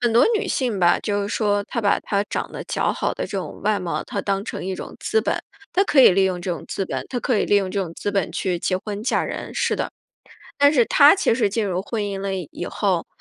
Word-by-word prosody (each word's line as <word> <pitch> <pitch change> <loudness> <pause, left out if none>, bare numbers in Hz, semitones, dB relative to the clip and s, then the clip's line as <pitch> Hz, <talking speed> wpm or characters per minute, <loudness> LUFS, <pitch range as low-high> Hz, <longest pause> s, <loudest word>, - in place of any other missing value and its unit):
很 240 -1 +2
多 235 - +6
女 415 -3 -1
性 240 -7 -1
吧， 175 0 +4
就 205 -1 -1
是 200 - -3
说 205 -2 +1
她 235 - -3
把 200 - +2
她 200 0 -1
长 - - -4
得 - - -7
姣好 - - -1
的 - - -4
这 - - -11
种 - - -7
外 210 0 +2
貌， 180 -2 -3
她 - - -4
当 195 -1 -1
成 - - -6
一 190 0 -2
种 - - -8
资 445 - +1
本， - - -1 0.4
她 390 +2 +3
可 295 - +4
以 255 - +9
利 195 +1 +3
用 185 -2 -1
这 180 - -3
种 170 - -4
资 195 - -3
本， - - -4
她 245 -2 -2
可 240 -5 +1
以 - - +1
利 205 - +3
用 190 -2 +1
这 200 - -2
种 165 -2 -6
资 205 - -3
本 195 -4 -1
去 180 -3 -1
结 185 - 0
婚 205 0 -6
嫁 230 - +1
人， - - -5
是 - - 0
的。 - - -3 0.7
但 285 +1 +6
是 245 -5 +5
她 290 +4 +7
其 385 - +2
实 225 -4 +1
进 215 +1 -1
入 185 -1 -1
婚 215 0 -3
姻 200 -1 -3
了 195 -1 -2
以 175 -6 -5
以 175 - -5
后， 185 -4 -1
205 Hz, 295 characters per minute, -22 LUFS, 190-230 Hz, 0.7 s, 以